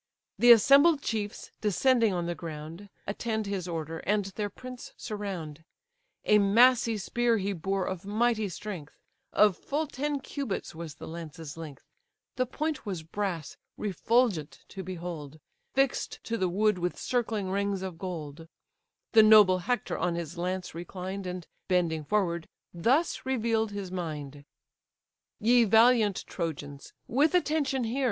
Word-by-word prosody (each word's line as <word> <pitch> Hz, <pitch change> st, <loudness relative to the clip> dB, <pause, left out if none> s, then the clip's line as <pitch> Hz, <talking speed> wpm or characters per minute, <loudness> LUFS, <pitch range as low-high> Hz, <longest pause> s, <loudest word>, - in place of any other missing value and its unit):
The 240 Hz, 0 st, +8 dB
assembled 280 Hz, +6 st, +7 dB
chiefs, 210 Hz, -2 st, -3 dB
descending 230 Hz, +2 st, +3 dB
on 175 Hz, -2 st, -1 dB
the 175 Hz, -, -1 dB
ground, 165 Hz, +4 st, -8 dB, 0.2 s
Attend 220 Hz, +1 st, -2 dB
his 195 Hz, -3 st, -3 dB
order, 165 Hz, -1 st, -4 dB
and 205 Hz, 0 st, 0 dB
their 205 Hz, +2 st, -4 dB
prince 250 Hz, +4 st, -10 dB
surround. 185 Hz, -8 st, -5 dB, 0.6 s
A 210 Hz, -, +5 dB
massy 230 Hz, +3 st, +5 dB
spear 235 Hz, +3 st, +1 dB
he 200 Hz, 0 st, -1 dB
bore 190 Hz, +2 st, -1 dB
of 185 Hz, -1 st, -4 dB
mighty 215 Hz, +1 st, +1 dB
strength, 180 Hz, -4 st, -7 dB, 0.3 s
Of 210 Hz, -3 st, +5 dB
full 300 Hz, -, -2 dB
ten 290 Hz, 0 st, -2 dB
cubits 270 Hz, -5 st, -4 dB
was 160 Hz, -2 st, -7 dB
the -, -, -9 dB
lance's 160 Hz, -2 st, -8 dB
length; 155 Hz, -4 st, -9 dB, 0.5 s
The 255 Hz, 0 st, 0 dB
point 305 Hz, +3 st, -3 dB
was 185 Hz, -6 st, -4 dB
brass, 170 Hz, -3 st, -4 dB, 0.2 s
refulgent 210 Hz, -, 0 dB
to 195 Hz, -, -7 dB
behold, 170 Hz, -5 st, -6 dB, 0.4 s
Fix'd 270 Hz, -1 st, 0 dB
to 230 Hz, -, -2 dB
the 185 Hz, -5 st, 0 dB
wood 210 Hz, +1 st, +2 dB
with 180 Hz, 0 st, -2 dB
circling 220 Hz, -6 st, -1 dB
rings 200 Hz, -1 st, -1 dB
of 180 Hz, -3 st, -6 dB
gold: 165 Hz, -4 st, -6 dB, 0.6 s
The 225 Hz, -, +8 dB
noble 210 Hz, -4 st, +7 dB
Hector 245 Hz, +7 st, -2 dB
on 175 Hz, -1 st, 0 dB
his 170 Hz, -1 st, -5 dB
lance 180 Hz, +1 st, -3 dB
reclined, 185 Hz, +3 st, -6 dB
And, 180 Hz, -2 st, -5 dB, 0.2 s
bending 170 Hz, -4 st, +1 dB
forward, 170 Hz, -2 st, 0 dB, 0.3 s
thus 255 Hz, -, +1 dB
reveal'd 230 Hz, -4 st, 0 dB
his 200 Hz, -3 st, -6 dB
mind: 150 Hz, -5 st, -5 dB, 0.9 s
"Ye 235 Hz, +2 st, +5 dB
valiant 225 Hz, -2 st, +4 dB
Trojans, 145 Hz, -5 st, -5 dB, 0.2 s
with 295 Hz, +8 st, +3 dB
attention 295 Hz, -6 st, +1 dB
hear! 235 Hz, +4 st, -2 dB
200 Hz, 140 wpm, -29 LUFS, 170-230 Hz, 0.9 s, The